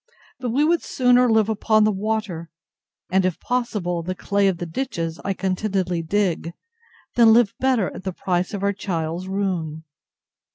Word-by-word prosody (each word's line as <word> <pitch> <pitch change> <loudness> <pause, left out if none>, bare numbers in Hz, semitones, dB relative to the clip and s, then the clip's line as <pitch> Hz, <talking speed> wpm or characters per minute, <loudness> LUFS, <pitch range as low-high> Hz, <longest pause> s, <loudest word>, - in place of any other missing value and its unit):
But 250 -2 -3
we 270 +6 +2
would 335 +2 +3
sooner 250 -1 +3
live 220 -2 +4
upon 215 0 +2
the 215 - +3
water, 200 -5 -3 0.6
and, 190 +1 +3
if 185 -2 -1
possible, 210 -9 -1
the 185 +2 -4
clay 200 +1 +1
of 190 -3 +1
the 175 - -4
ditches 165 -4 -3
I 195 -1 -1
contentedly 185 -2 -1
dig, 170 -1 -1 0.6
than 230 -2 +6
live 230 -3 +4
better 255 -7 +1
at - - -9
the 190 - -2
price 180 0 -1
of 200 - -5
our 200 0 +2
child's 175 -2 -3
ruin. 180 -5 -2
195 Hz, 165 wpm, -22 LUFS, 175-220 Hz, 0.6 s, than